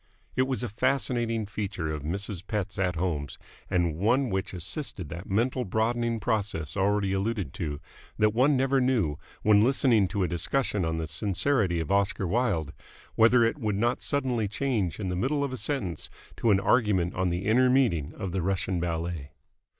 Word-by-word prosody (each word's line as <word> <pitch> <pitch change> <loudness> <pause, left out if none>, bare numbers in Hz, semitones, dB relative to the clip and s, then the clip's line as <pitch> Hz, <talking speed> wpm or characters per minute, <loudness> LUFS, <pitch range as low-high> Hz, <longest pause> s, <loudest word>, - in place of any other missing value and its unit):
It 130 +1 +2
was 130 -2 -2
a 120 - -2
fascinating 120 -1 0
feature 95 -6 -3
of 75 - -4
Mrs. 95 +4 -3
Pett's 100 -2 -3
at 90 -2 +1
homes 80 -6 -2 0.3
and 85 -4 +1
one 120 +5 +2
which 95 0 -2
assisted 90 - -3
that 85 +4 -8
mental 125 +6 +1
broadening 115 +2 0
process 105 -9 -2
already 100 0 +1
alluded 100 - -2
to 75 -3 -4 0.4
that 105 -1 +3
one 130 +4 +4
never 135 +1 +2
knew, 110 - +1 0.2
when 105 0 +5
listening 120 -5 +3
to 100 0 -1
a - - +1
discussion 100 +3 -1
on 80 0 -1
the 80 - -2
sincerity 95 - +1
of 80 - -3
Oscar 100 -1 +1
Wilde, 85 - 0 0.4
whether 115 +2 +5
it 115 +6 0
would 105 -5 -1
not 120 +4 +1
suddenly 125 -6 0
change 105 - -1
in 95 -3 -2
the 90 - -2
middle 140 +9 0
of 140 -2 -2
a - - -4
sentence 100 - -2 0.3
to 115 - +1
an 100 -2 +5
argument 100 -6 +2
on 95 0 0
the 90 +3 -2
inner 125 +4 +4
meaning 115 - +2
of 95 -4 -4
the 95 +1 -1
Russian 95 0 -1
Ballet. 85 -3 -3
100 Hz, 180 wpm, -27 LUFS, 90-120 Hz, 0.4 s, when